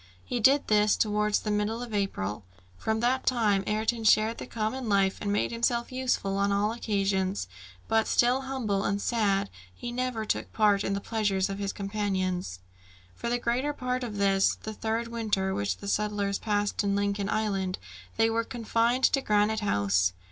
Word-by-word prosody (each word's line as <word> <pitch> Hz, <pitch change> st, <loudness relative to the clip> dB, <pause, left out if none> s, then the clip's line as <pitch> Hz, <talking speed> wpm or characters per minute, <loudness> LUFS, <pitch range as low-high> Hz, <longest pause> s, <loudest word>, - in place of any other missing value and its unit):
He 245 Hz, -, -2 dB
did 275 Hz, +5 st, +4 dB
this 210 Hz, 0 st, +3 dB
towards 210 Hz, -1 st, +1 dB
the 210 Hz, -, -2 dB
middle 210 Hz, +3 st, -1 dB
of 235 Hz, -3 st, -8 dB
April. 105 Hz, -, -2 dB, 0.3 s
From 220 Hz, -, -1 dB
that 255 Hz, +2 st, +1 dB
time 215 Hz, -6 st, +2 dB
Ayrton 220 Hz, +2 st, 0 dB
shared 220 Hz, +1 st, +4 dB
the -, -, -7 dB
common 230 Hz, +2 st, -3 dB
life, 195 Hz, -1 st, +2 dB
and 205 Hz, -, -1 dB
made 205 Hz, -, 0 dB
himself 235 Hz, +1 st, 0 dB
useful 250 Hz, -6 st, -1 dB
on 200 Hz, 0 st, +2 dB
all 205 Hz, +2 st, +1 dB
occasions; 195 Hz, -, -1 dB, 0.4 s
but 225 Hz, 0 st, +2 dB
still 250 Hz, +2 st, +3 dB
humble 245 Hz, -7 st, -2 dB
and 200 Hz, 0 st, 0 dB
sad, 200 Hz, -3 st, 0 dB, 0.2 s
he 240 Hz, -, -7 dB
never 245 Hz, -3 st, -2 dB
took -, -, -2 dB
part 205 Hz, -2 st, +3 dB
in 195 Hz, -, -1 dB
the 200 Hz, -, -2 dB
pleasures 200 Hz, -3 st, 0 dB
of 195 Hz, -, -5 dB
his 200 Hz, -1 st, -2 dB
companions. 190 Hz, -, -2 dB, 0.5 s
For 235 Hz, -, -4 dB
the 240 Hz, -, +1 dB
greater 245 Hz, +5 st, -1 dB
part 255 Hz, -1 st, -2 dB
of 220 Hz, -4 st, -5 dB
this, 195 Hz, -1 st, +3 dB
the 220 Hz, -, -7 dB
third 225 Hz, +2 st, -2 dB
winter 210 Hz, -5 st, -1 dB
which 100 Hz, -2 st, -1 dB
the -, -, -9 dB
settlers 205 Hz, -1 st, 0 dB
passed 205 Hz, -1 st, 0 dB
in 200 Hz, 0 st, +1 dB
Lincoln 200 Hz, 0 st, -1 dB
Island, 195 Hz, -4 st, -1 dB, 0.4 s
they 225 Hz, 0 st, +4 dB
were 225 Hz, 0 st, 0 dB
confined 235 Hz, +2 st, 0 dB
to 275 Hz, -, +4 dB
Granite 210 Hz, -1 st, +2 dB
House. 100 Hz, -, +1 dB
210 Hz, 175 wpm, -28 LUFS, 200-230 Hz, 0.5 s, did